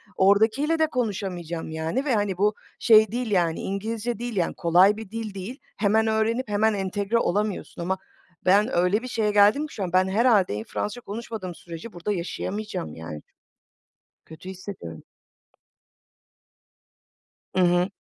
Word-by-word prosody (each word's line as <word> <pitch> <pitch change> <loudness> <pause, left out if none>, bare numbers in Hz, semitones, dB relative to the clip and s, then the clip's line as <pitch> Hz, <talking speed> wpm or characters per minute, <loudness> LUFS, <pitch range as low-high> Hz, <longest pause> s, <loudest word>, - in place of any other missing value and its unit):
oradakiyle 220 +11 +3
de 315 - +4
konuşamayacağım, 190 - -3
yani, 160 - -2
ve, 265 - +1
hani, 205 -3 0
bu 210 +2 +3 0.3
şey 220 -3 +6
değil, 240 -2 -2
yani, 170 -4 +2
İngilizce 220 +3 -3
değil, 240 -1 -4
yani, 175 -3 0
kolay 185 +4 +4
bir 220 -3 -8
dil 225 -3 -5
değil, 200 +8 -7 0.2
hemen 220 +2 +2
öğrenip 220 +2 0
hemen 215 +1 +2
entegre 200 +3 -1
olamıyorsun 205 -4 -1
ama 190 +2 -1 0.5
ben 205 +6 +4
öyle 180 +5 +3
bir 255 - -6
şeye 220 -4 0
geldim 210 +9 +4
ki - - -14
şu 200 - -4
an, 180 -1 -4
ben 185 0 +4
herhâlde 205 - +3
iyi 105 - -3
Fransızca 210 - -4
konuşmadığım 210 -5 -6
sürece 170 +6 -9
burada 175 +4 -3
yaşayamayacağım 190 - -4
yani 80 -2 -8 1.0
kötü 170 +4 -11
hissediyorum. 185 - -8 2.5
I - - +2
hı. 175 +1 +3
205 Hz, 145 wpm, -25 LUFS, 180-220 Hz, 2.5 s, şey